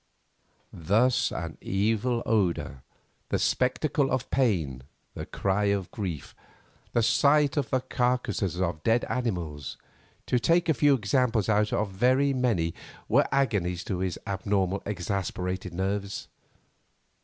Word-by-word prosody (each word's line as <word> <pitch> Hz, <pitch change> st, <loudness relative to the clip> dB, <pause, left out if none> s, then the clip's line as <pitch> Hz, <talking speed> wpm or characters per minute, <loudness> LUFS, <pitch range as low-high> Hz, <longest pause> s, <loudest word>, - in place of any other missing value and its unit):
Thus 110 Hz, +10 st, +2 dB
an 80 Hz, -2 st, -5 dB
evil 110 Hz, +4 st, 0 dB
odour, 90 Hz, -, 0 dB, 0.5 s
the -, -, +1 dB
spectacle 135 Hz, +2 st, +1 dB
of 130 Hz, -3 st, -2 dB
pain, 85 Hz, -, +1 dB, 0.3 s
the -, -, -6 dB
cry 100 Hz, +1 st, 0 dB
of 100 Hz, -3 st, 0 dB
grief, 90 Hz, -9 st, -5 dB, 0.6 s
the 115 Hz, -, +2 dB
sight 145 Hz, +4 st, +4 dB
of 145 Hz, -5 st, -1 dB
the 130 Hz, -, +1 dB
carcases 125 Hz, -9 st, -1 dB
of 85 Hz, -4 st, -1 dB
dead 115 Hz, +7 st, +2 dB
animals, 85 Hz, -, -3 dB, 0.5 s
to 125 Hz, -, +1 dB
take 170 Hz, +6 st, +2 dB
a 160 Hz, -, +4 dB
few 145 Hz, +2 st, +4 dB
examples 115 Hz, -1 st, +1 dB
out 105 Hz, 0 st, +2 dB
of 105 Hz, 0 st, 0 dB
very 130 Hz, +7 st, +3 dB
many, 110 Hz, -11 st, +1 dB, 0.3 s
were -, -, +3 dB
agonies 100 Hz, -10 st, 0 dB
to 95 Hz, -, -3 dB
his 95 Hz, -1 st, -2 dB
abnormal, 100 Hz, 0 st, -1 dB
exasperated 95 Hz, -1 st, -3 dB
nerves. 100 Hz, +3 st, -3 dB
105 Hz, 125 wpm, -27 LUFS, 95-125 Hz, 0.6 s, sight